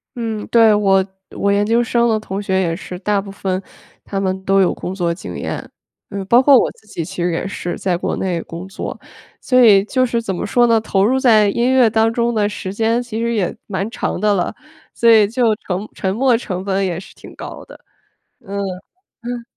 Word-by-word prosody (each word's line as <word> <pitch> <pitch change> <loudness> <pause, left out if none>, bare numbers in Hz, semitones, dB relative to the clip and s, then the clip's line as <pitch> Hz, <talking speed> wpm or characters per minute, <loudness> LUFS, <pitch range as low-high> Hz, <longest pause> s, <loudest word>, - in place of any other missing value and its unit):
嗯， 225 -3 -4
对， 225 -2 +5
我 195 -2 +3 0.3
我 200 - +1
研 200 +1 +2
究 230 +2 +2
生 235 0 +1
的 220 -1 +1
同 195 -1 -5
学 190 -2 0
也 170 -3 0
是， 180 +1 -8
大 205 0 0
部 195 0 -9
分 190 -1 -3 0.4
他 195 - -4
们 190 0 -2
都 195 0 +4
有 185 - +2
工 185 - -6
作 175 -3 0
经 170 - -8
验， - - -5 0.4
嗯， 200 -2 -5
包 235 +6 +5
括 270 -1 +7
我 - - +2
自 220 - -24
己 165 -5 -5
其 185 -2 -5
实 175 - +1
也 165 +3 -2
是 175 -2 -4
在 185 -2 0
国 175 - -2
内 180 -3 -1
工 170 +3 -8
作。 190 - -6 0.4
所 255 -1 +2
以 200 -4 +7
就 255 +2 +1
是 235 -1 -1
怎 195 -5 -3
么 205 - -3
说 240 +3 +3
呢， 230 -2 +3
投 195 -2 +1
入 260 +3 +2
在 220 -5 +5
音 240 +5 +1
乐 255 -3 +5
当 225 +1 +2
中 235 0 0
的 210 -1 +1
时 190 -2 -6
间 225 +3 +1
其 235 -2 -5
实 235 0 0
也 190 -5 -1
蛮 195 +1 -3
长 235 - -3
的 210 0 +2
了， 180 -3 -1 0.4
所 235 - +3
以 220 -2 +6
就 230 -1 +1
沉 195 +1 -5
沉 190 0 -2
没 255 0 +3
成 185 -6 -5
本 195 0 0
也 175 -2 -2
是 - - -13
挺 - - -14
高 - - -8
的。 - - -14 0.6
嗯， 200 +1 -7 0.5
呃。 240 0 -7
205 Hz, 240 characters per minute, -18 LUFS, 190-230 Hz, 0.6 s, 括